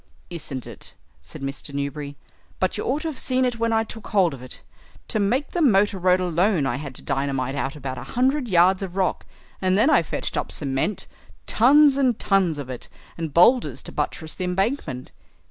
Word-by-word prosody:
"Isn't 140 -7 -5
it?" - - -8 0.3
said 135 - -8
Mr. 140 +1 -5
Newberry. 140 0 -4 0.4
"But 185 - 0
you 210 - -3
ought 285 +5 -1
to - - -2
have 295 - -7
seen 255 0 +1
it 245 -2 -2
when 230 0 +1
I 225 0 +2
took 225 -1 -9
hold 190 -6 +2
of 130 - -9
it. 130 - -10 0.5
To 215 - +1
make 240 +8 0
the 350 - -1
motor 205 -7 +3
road 180 +1 +3
alone 180 -2 +1
I 125 -2 -1
had 140 -2 -7
to - - -10
dynamite 135 -1 -1
out 140 0 -3
about 130 -3 -5
a - - -7
hundred 260 +2 +2
yards 185 0 +4
of 190 -2 -5
rock, 190 -2 -1 0.3
and 185 0 +2
then 265 +9 +4
I - - +5
fetched - - -4
up - - -2
cement, 135 +7 -1 0.4
tons 280 +4 +5
and 255 -5 +2
tons 190 -6 +1
of 140 -3 -6
it, 130 -2 -7 0.3
and 165 -2 -4
boulders 235 - +4
to - - -8
buttress 160 -1 -3
the 185 - -5
embankment." 180 - -2
185 Hz, 200 wpm, -23 LUFS, 140-230 Hz, 0.5 s, I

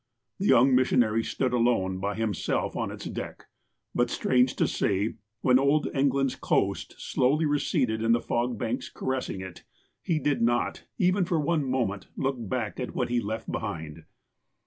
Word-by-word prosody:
The 200 - 0
young 130 +3 +6
missionary 120 -3 +3
stood 130 +1 -1
alone, 115 -6 +1
by 100 +1 -2
himself, 110 -2 -1
on - - -2
its - - -8
deck, - - -6 0.5
but, 120 0 +1
strange 125 +1 +2
to - - +2
say, 100 +2 0 0.3
when 125 0 +5
old 140 +3 +2
England's 135 -1 +2
coast - - 0
slowly 145 +5 +1
receded 140 -6 +1
in 115 0 +2
the 120 - +4
fog 120 0 -1
banks 115 +4 -3
caressing 130 -7 -3
it 95 -2 -9 0.4
he 165 - 0
did 145 -4 0
not, 120 +1 +1
for - - -26
even 185 +1 +2
one 165 -3 +1
moment, 110 -7 -1
look 135 -1 0
back 115 0 -3
on 125 - -2
what 125 - -1
he 120 0 +1
left 110 +1 -4
behind. 80 -6 -5
125 Hz, 165 wpm, -27 LUFS, 110-135 Hz, 0.5 s, young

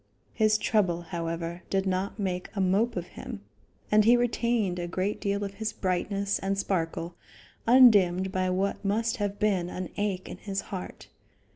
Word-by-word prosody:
His 215 -1 +3
trouble, 205 -5 +1
however, 170 0 -4
did 195 0 0
not 190 +1 -1
make 185 -3 -2
a - - -2
mope 195 +5 +2
of 175 -2 -3
him, 235 -5 -8 0.5
and 210 0 +6
he 235 +3 +6
retained 235 -6 0
a 175 - -3
great 185 +4 -2
deal 200 0 -1
of 200 -1 -4
his 220 +2 -3
brightness 195 +2 -1
and 195 +1 -1
sparkle 170 -3 -2 0.5
undimmed 200 -7 +6
by 185 -1 0
what 190 +3 -1
must 220 +3 0
have 205 -1 -2
been 195 -4 +1
an 180 -1 -5
ache 200 -3 -2
in - - -7
his 195 -2 -3
heart. 185 -2 -8
195 Hz, 165 wpm, -28 LUFS, 180-210 Hz, 0.5 s, and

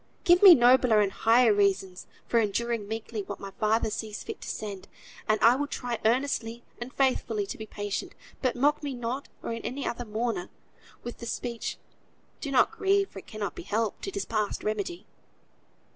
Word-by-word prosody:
Give 350 -2 +5
me 380 -4 +11
nobler 245 -3 +5
and 200 -2 +2
higher 230 +2 +4
reasons 195 -2 0 0.2
for 235 - +2
enduring 225 0 -1
meekly 220 0 -4
what 205 0 -7
my 195 -1 -7
Father 220 0 +2
sees 215 0 -5
fit - - -7
to - - -8
send, 200 -3 -6 0.4
and 215 0 +3
I 235 +2 +7
will 290 +2 -1
try 245 -4 -4
earnestly 235 -1 0 0.2
and 240 +2 -6
faithfully 245 -6 0
to 195 - -6
be 220 - -7
patient; 205 -1 -4 0.3
but 255 -3 0
mock 285 +5 +2
me 285 -3 -4
not, 245 +3 -4
or - - -3
any 250 +4 -4
other 245 - -3
mourner, 215 -4 -2 0.5
with 240 - -7
the 235 - -7
speech, 235 0 -4 0.6
"Do 285 - -5
not 265 -2 +4
grieve, 395 -2 +1
for 195 - -8
it - - -17
cannot 215 -2 -4
be - - -8
helped. 215 - -2
It 390 - -5
is 400 - -2
past 215 -2 -2
remedy." 345 - -3
230 Hz, 185 wpm, -28 LUFS, 210-260 Hz, 0.6 s, me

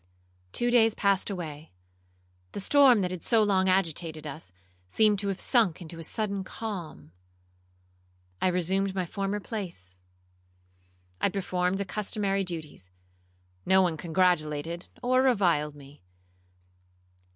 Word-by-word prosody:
Two 240 - 0
days 225 -2 +4
passed 200 -1 +1
away,—the 90 - -10
storm 260 0 +5
that 180 -1 -1
had 180 -2 -5
so 225 -2 +3
long 190 -2 +2
agitated 165 -4 0
us, 135 -11 -7 0.4
seemed 210 - +3
to 200 - -2
have 195 -1 -2
sunk 225 - +2
into 170 -1 -9
a - - -7
sudden 200 +2 -2
calm. 175 - -7 1.3
I - - +3
resumed 190 +2 0
my 185 -2 -1
former 195 +3 -3
place,—I 90 - -8
performed 185 -1 -1
the 200 - -2
customary 200 -1 -1
duties,—no 90 - -4
one 180 -3 +2
congratulated 165 -1 0
or 255 +1 +3
reviled 175 - +2
me. 140 -3 -15
175 Hz, 115 wpm, -28 LUFS, -, 1.3 s, storm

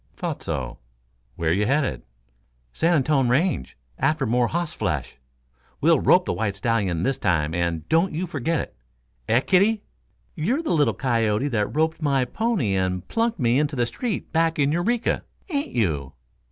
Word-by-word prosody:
"Thought - - -4
so. - - -4 0.6
Where 80 -1 0
you 105 +3 +1
headed?" 140 +1 0 0.7
"San 170 +1 +2
Antone 135 -3 +2
Range 135 - 0 0.2
after 155 -3 +1
more 120 +1 +2
hoss 170 +2 -2
flesh. 75 - -3 0.6
We'll - - +4
rope - - +4
the - - -1
white 105 -3 -2
stallion 95 -5 0
this 135 +6 0
time, 80 -3 +1
and 85 -2 -2
don't 165 +4 +2
you 170 +4 -2
forget 160 -1 -1
it. - - -6 0.5
Eh, 115 +3 +4
kiddie? 200 +7 +3 0.5
You're 245 - -1
the 315 - 0
little 150 -3 +2
coyote 115 0 +1
what 105 -2 -1
roped 160 +1 +1
my 140 -4 +2
pony 210 - 0
and 90 -1 -1
plunked 230 0 0
me 120 0 +3
into 150 0 0
the 120 -2 +1
street 205 - -4
back 165 0 +2
in 140 -1 +2
Eureka, 220 +9 0 0.3
ain't 285 - -2
you?" 75 - 0
135 Hz, 165 wpm, -24 LUFS, 105-165 Hz, 0.7 s, We'll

